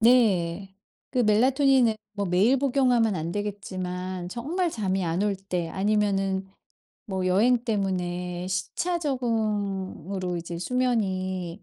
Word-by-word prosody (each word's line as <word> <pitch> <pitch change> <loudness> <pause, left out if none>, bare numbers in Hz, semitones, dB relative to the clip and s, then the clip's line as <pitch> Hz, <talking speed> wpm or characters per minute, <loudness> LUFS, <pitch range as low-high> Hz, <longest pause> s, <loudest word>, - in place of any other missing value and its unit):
네. 195 -6 +3 0.4
그 255 - -2
멜라토닌은 250 +1 +4 0.2
뭐 200 -1 -2
매일 200 +9 +3
복용하면 250 -5 +3
안 160 +2 -3
되겠지만 185 -3 -4
정말 325 - -1
잠이 190 -5 -1
안 170 +3 0
올 205 -1 +1
때 180 -3 -3
아니면은 195 0 0 0.6
뭐 190 -2 -2
여행 230 +6 +3
때문에 180 -4 -2
시차 340 - -1
적응으로 200 - -2
이제 170 0 -5
수면이 190 -6 -1
195 Hz, 245 characters per minute, -26 LUFS, 185-235 Hz, 0.6 s, 멜라토닌은